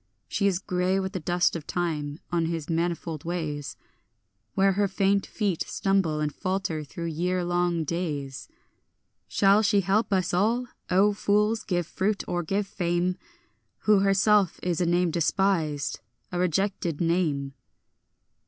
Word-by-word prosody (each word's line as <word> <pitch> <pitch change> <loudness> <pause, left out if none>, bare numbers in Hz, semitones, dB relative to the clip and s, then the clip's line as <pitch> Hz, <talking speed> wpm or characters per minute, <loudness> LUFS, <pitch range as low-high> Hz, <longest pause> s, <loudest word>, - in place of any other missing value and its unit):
She 200 - +1
is 190 -3 +2
grey 185 +1 0
with 190 0 -3
the 185 - -2
dust 175 +2 +1
of 160 -3 -6
time 155 -4 -2
on 170 -2 +1
his 165 -1 -3
manifold 165 -2 -2
ways, 155 -4 -4 0.8
Where 195 0 +4
her 200 +1 +1
faint 195 +1 +1
feet 200 -6 -1
stumble 190 -6 +1
and 150 -1 -1
falter 185 -5 -2
through 170 +4 -7
year 175 +3 -1
long 175 -1 +1
days. 150 -5 -3 0.8
Shall 200 +1 +4
she 205 -1 +3
help 200 +4 +1
us 185 -2 +1
at - - +2
all, 235 +5 +1 0.2
O 195 +3 +4
fools, 210 +2 +1
give 175 -3 -1
fruit 200 +5 -1
or 175 - -1
give 195 +5 -1
fame, 180 -1 -1 0.7
Who 210 -2 +4
herself 195 0 +3
is 180 -1 0
a 175 - +2
name 175 0 +2
despised, 165 -4 0 0.3
a 175 - -2
rejected 180 -2 0
name? 160 -5 0
180 Hz, 145 wpm, -26 LUFS, 165-195 Hz, 0.8 s, Where